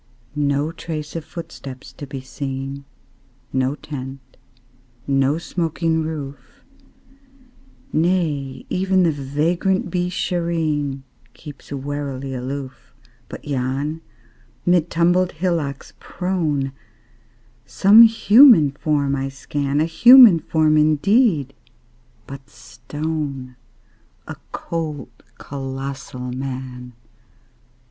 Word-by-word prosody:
No 145 Hz, +1 st, 0 dB
trace 155 Hz, -2 st, -6 dB
of 165 Hz, -, -4 dB
footsteps 140 Hz, -5 st, -9 dB
to 145 Hz, -, -9 dB
be 135 Hz, -1 st, -7 dB
seen, 135 Hz, +1 st, -6 dB, 0.7 s
No 130 Hz, +1 st, 0 dB
tent, 135 Hz, -3 st, -9 dB, 0.7 s
no 135 Hz, +1 st, +1 dB
smoking 165 Hz, -1 st, -1 dB
roof; 145 Hz, -4 st, -7 dB, 1.3 s
Nay, 155 Hz, -6 st, 0 dB
even 190 Hz, 0 st, +1 dB
the 165 Hz, -, +3 dB
vagrant 155 Hz, +7 st, -1 dB
Beeshareen 170 Hz, -6 st, -1 dB, 0.3 s
Keeps 145 Hz, -3 st, -12 dB
warily 140 Hz, -1 st, -4 dB
aloof. 130 Hz, +1 st, -7 dB, 0.3 s
But -, -, -9 dB
yon, 140 Hz, +3 st, -2 dB, 0.6 s
mid 175 Hz, -2 st, +3 dB
tumbled 175 Hz, +2 st, +2 dB
hillocks 160 Hz, -5 st, -3 dB
prone, 160 Hz, -7 st, -2 dB, 1.0 s
Some 205 Hz, +3 st, +6 dB
human 225 Hz, -, +7 dB
form 140 Hz, -1 st, 0 dB
I 135 Hz, 0 st, -3 dB
scan 140 Hz, +1 st, -2 dB
A 155 Hz, -, +3 dB
human 235 Hz, +2 st, +8 dB
form, 155 Hz, -1 st, +2 dB
indeed, 155 Hz, -, +2 dB, 0.7 s
but 135 Hz, -1 st, -11 dB
stone: 135 Hz, +1 st, -6 dB, 0.7 s
A -, -, -6 dB, 0.2 s
cold, 155 Hz, -6 st, -5 dB, 0.3 s
colossal 135 Hz, -2 st, -6 dB
Man! 125 Hz, -1 st, -6 dB
145 Hz, 90 wpm, -21 LUFS, 135-165 Hz, 1.3 s, human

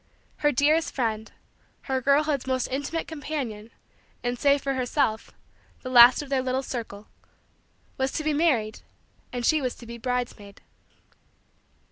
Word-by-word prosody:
Her 295 Hz, -, +2 dB
dearest 300 Hz, +5 st, +2 dB
friend 220 Hz, -4 st, -2 dB, 0.5 s
her 265 Hz, -1 st, -2 dB
girlhood's 280 Hz, 0 st, +2 dB
most 260 Hz, -1 st, 0 dB
intimate 285 Hz, +5 st, -3 dB
companion, 275 Hz, -8 st, -5 dB, 0.5 s
and, 245 Hz, 0 st, -2 dB
save 280 Hz, -1 st, +3 dB
for 275 Hz, -, 0 dB
herself, 255 Hz, -3 st, -1 dB, 0.5 s
the 255 Hz, -, -5 dB
last 245 Hz, +3 st, +8 dB
of 285 Hz, -, -11 dB
their 270 Hz, -2 st, +1 dB
little 260 Hz, +1 st, -1 dB
circle 220 Hz, -5 st, -6 dB, 0.9 s
was 265 Hz, 0 st, 0 dB
to 310 Hz, -, -2 dB
be 305 Hz, 0 st, +1 dB
married 270 Hz, -9 st, +1 dB, 0.5 s
and 245 Hz, -1 st, -3 dB
she 310 Hz, +2 st, +3 dB
was 255 Hz, -2 st, -2 dB
to 235 Hz, -, -13 dB
be 235 Hz, 0 st, -9 dB
bridesmaid. 240 Hz, -5 st, -4 dB
260 Hz, 140 wpm, -26 LUFS, 235-285 Hz, 0.9 s, last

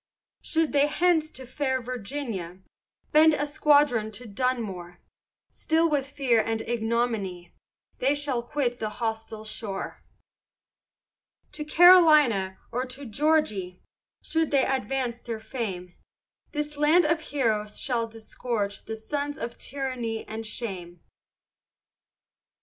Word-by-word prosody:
Should 320 Hz, -1 st, 0 dB
they 285 Hz, 0 st, +4 dB
thence 335 Hz, -3 st, +3 dB
to 260 Hz, -4 st, -9 dB
fair 260 Hz, +1 st, -1 dB
Virginia, 235 Hz, -7 st, -5 dB, 0.5 s
Bend 310 Hz, 0 st, +6 dB
a 290 Hz, -, -1 dB
squadron 290 Hz, -6 st, +3 dB
to 245 Hz, +4 st, -6 dB
Dunmore, 205 Hz, -6 st, -3 dB, 0.5 s
Still 325 Hz, +1 st, +1 dB
with 280 Hz, -2 st, 0 dB
fear 260 Hz, -6 st, +2 dB
and 225 Hz, 0 st, -2 dB
ignominy, 225 Hz, -6 st, -2 dB, 0.5 s
They 275 Hz, +3 st, +2 dB
shall 285 Hz, -4 st, -1 dB
quit 245 Hz, -1 st, -2 dB
the 215 Hz, -, -2 dB
hostile 220 Hz, -1 st, -4 dB
shore. 210 Hz, -2 st, -5 dB, 1.5 s
To 305 Hz, -, -5 dB
Carolina 305 Hz, -, +6 dB
or 245 Hz, +2 st, -1 dB
to 265 Hz, +3 st, -7 dB
Georg'y, 220 Hz, -, 0 dB, 0.4 s
Should 320 Hz, -1 st, 0 dB
they 275 Hz, -2 st, +3 dB
next 270 Hz, -, +1 dB
advance 255 Hz, -2 st, -2 dB
their 230 Hz, -2 st, -5 dB
fame, 195 Hz, -7 st, -5 dB, 0.6 s
This 295 Hz, 0 st, -4 dB
land 305 Hz, +4 st, +5 dB
of 325 Hz, +1 st, +1 dB
heroes 215 Hz, -8 st, -1 dB
shall 235 Hz, -3 st, 0 dB
disgorge 225 Hz, -2 st, -4 dB
the 220 Hz, -, -4 dB
Sons 285 Hz, +6 st, -4 dB
of 235 Hz, 0 st, -6 dB
tyranny 255 Hz, -5 st, -4 dB
and 220 Hz, 0 st, -5 dB
shame. 180 Hz, -7 st, -6 dB
245 Hz, 120 wpm, -26 LUFS, 220-290 Hz, 1.5 s, Bend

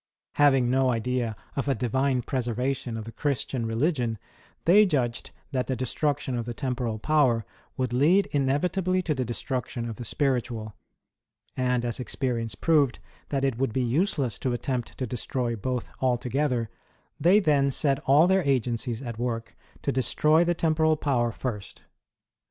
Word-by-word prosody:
Having 135 Hz, -4 st, +4 dB
no 130 Hz, 0 st, +3 dB
idea 120 Hz, -1 st, -1 dB, 0.2 s
of 140 Hz, -, -2 dB
a 135 Hz, -, +2 dB
divine 130 Hz, +1 st, 0 dB
preservation 125 Hz, -1 st, -2 dB
of 110 Hz, -, -6 dB
the 115 Hz, -, -7 dB
Christian 130 Hz, -3 st, -2 dB
religion, 120 Hz, -1 st, 0 dB, 0.5 s
they 200 Hz, +5 st, +7 dB
judged 130 Hz, -, 0 dB, 0.2 s
that 130 Hz, -2 st, -1 dB
the 130 Hz, -, -1 dB
destruction 130 Hz, +2 st, -1 dB
of 120 Hz, -1 st, -2 dB
the 120 Hz, -1 st, -5 dB
temporal 125 Hz, -4 st, -2 dB
power 125 Hz, -3 st, +2 dB, 0.3 s
would 130 Hz, -2 st, -1 dB
lead 170 Hz, +10 st, +4 dB
inevitably 180 Hz, +7 st, +1 dB
to 160 Hz, -, 0 dB
the 130 Hz, -3 st, -1 dB
destruction 120 Hz, 0 st, -3 dB
of 115 Hz, -, -6 dB
the 120 Hz, -, -6 dB
spiritual; 120 Hz, -4 st, -1 dB, 0.8 s
and 125 Hz, -1 st, 0 dB
as 120 Hz, +1 st, -3 dB
experience 120 Hz, -5 st, -2 dB
proved 145 Hz, -, +2 dB, 0.3 s
that 135 Hz, -1 st, 0 dB
it 130 Hz, -3 st, -1 dB
would 135 Hz, -5 st, 0 dB
be 130 Hz, -, +1 dB
useless 130 Hz, -, +1 dB
to 130 Hz, -, -1 dB
attempt 120 Hz, 0 st, -3 dB
to 130 Hz, -, -2 dB
destroy 120 Hz, 0 st, -2 dB
both 125 Hz, +3 st, -3 dB
altogether, 125 Hz, -1 st, 0 dB, 0.5 s
they 180 Hz, +7 st, +5 dB
then 145 Hz, -7 st, +3 dB
set 135 Hz, 0 st, +1 dB
all 145 Hz, +5 st, +6 dB
their 190 Hz, +1 st, +3 dB
agencies 125 Hz, -2 st, 0 dB
at 115 Hz, -3 st, -6 dB
work 115 Hz, -2 st, -3 dB, 0.3 s
to -, -, +1 dB
destroy 150 Hz, +5 st, +3 dB
the 175 Hz, 0 st, +1 dB
temporal 160 Hz, -1 st, +2 dB
power 125 Hz, -6 st, +1 dB
first. 105 Hz, -5 st, -5 dB
130 Hz, 155 wpm, -26 LUFS, 120-145 Hz, 0.8 s, they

